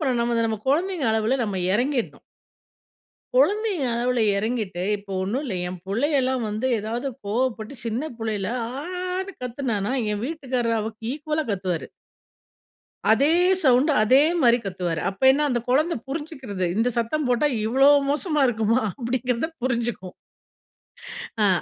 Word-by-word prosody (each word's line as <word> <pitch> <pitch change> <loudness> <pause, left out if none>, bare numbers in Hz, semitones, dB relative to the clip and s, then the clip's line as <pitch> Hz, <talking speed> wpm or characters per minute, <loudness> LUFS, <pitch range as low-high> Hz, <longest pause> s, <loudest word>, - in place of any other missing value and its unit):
பண்னனும் 255 -5 +1
நம 230 0 +2
நம்ம 220 -2 -2
குழந்தைங்க 340 +1 +1
அளவுல 220 +4 +1
நம்ம 200 -3 -3
இறங்கிறணும். 245 +3 -1 1.1
கொழந்தைங்க 420 - +2
அளவுல 245 0 +1 0.2
இறங்கிட்டு, 215 -4 -2 0.2
இப்போ 200 -1 -12
ஒண்ணுல்ல 240 +3 -2
என் 180 0 -6
புள்ளையெல்லாம் 260 +4 +1
வந்து, 215 +5 -3
ஏதாவது 230 +5 -3 0.2
கோவப்பட்டு 230 +2 -2
சின்ன 245 +8 -2
புள்ளையில 215 -3 -2 0.3
ஆன்னு 365 +2 -4
கத்துனான்னா, 245 -3 -2 0.2
என் 210 +2 -3
வீட்டுக்காரரு 255 -6 -1
அவளுக் 220 +1 -5
ஈக்குவலா 305 +2 -2
கத்துவாரு. 185 -4 -2 1.2
அதே 280 +9 +4 0.3
சவுண்டு, 265 +2 +4
அதே 260 +6 +5 0.2
மாரி 240 -1 +5
கத்துவாரு. 180 -4 -2
அப்போ 195 +6 -8
என்ன 295 +2 +1
அந்த 240 -1 +1
குழந்தை 310 +7 +2
புரிஞ்சுக்குடுது. 270 - -4
இந்த 230 +3 +2
சத்தம் 255 +6 0
போட்டா, 250 +4 +2 0.2
இவ்வளோ 270 +4 +4 0.2
மோசமா 300 0 0
இருக்குமா?" 225 +1 +1 0.2
அப்படிங்கிறத 250 +2 -1
புரிஞ்சுக்கும். 235 -7 -2 1.3
அ. - - +5
245 Hz, 125 wpm, -24 LUFS, 220-285 Hz, 1.3 s, அதே